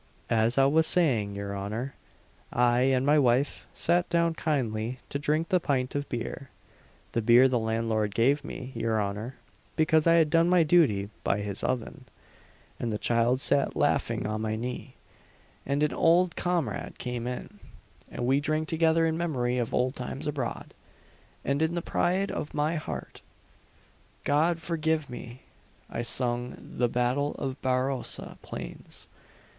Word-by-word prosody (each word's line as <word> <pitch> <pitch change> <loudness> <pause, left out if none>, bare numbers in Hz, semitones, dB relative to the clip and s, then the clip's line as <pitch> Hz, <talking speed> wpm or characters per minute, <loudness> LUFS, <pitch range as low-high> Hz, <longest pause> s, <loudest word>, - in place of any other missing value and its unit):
"As 115 +2 +2
I 135 - +6
was 160 +3 +3
saying, 115 - +1
your 100 0 -4
honour, 110 +7 -4 0.6
I 120 0 +3
and 130 0 +2
my 150 +1 +5
wife 130 +1 +1
sat 175 +1 +1
down 170 -1 +2
kindly 125 -7 -1
to 140 - -2
drink 155 +3 0
the 185 -2 +3
pint 130 -5 -1
of 145 -1 -3
beer 125 +2 -5 0.6
the 115 - 0
beer 120 +4 +6
the 125 -2 +1
landlord 110 -2 -1
gave 140 +5 +3
me, 130 0 -7
your 115 -1 0
honour, 105 +5 -3 0.4
because 160 0 +3
I 165 - +6
had 160 -3 +4
done 165 +2 +4
my 180 -2 +5
duty 140 - +3
by 100 +1 +1
his 100 -1 -5
oven; 125 -2 -3 0.7
and 115 - -2
the 105 - -1
child 120 +3 +2
sat 140 -1 +2
laughing - - +1
on 110 0 -2
my 110 0 -1
knee, 125 +3 -5 0.7
and 140 +2 +1
an 150 - +1
old 175 +1 +3
comrade 175 -2 -2
came 125 -1 -4
in, 125 0 -6 0.5
and 120 - -4
we 135 +3 +3
drank 155 +2 -1
together 165 0 +3
in 160 0 0
memory 125 -7 0
of 120 - -2
old 125 +2 +1
times 130 +2 -5
abroad, 140 -5 -4 0.7
and 140 +2 0
in 160 +2 +1
the 170 - -1
pride 190 +3 0
of 150 - -5
my 150 +3 +1
heart 80 - -6 1.0
God 160 +4 +2
forgive 160 -3 -1
me! 120 +1 -9 0.5
I 115 - -2
sung 120 0 -1
the 120 -1 -2
'Battle 125 +4 0
of 135 -1 -4
Barossa 130 0 -1
Plains.' - - -7
130 Hz, 155 wpm, -28 LUFS, 115-155 Hz, 1.0 s, I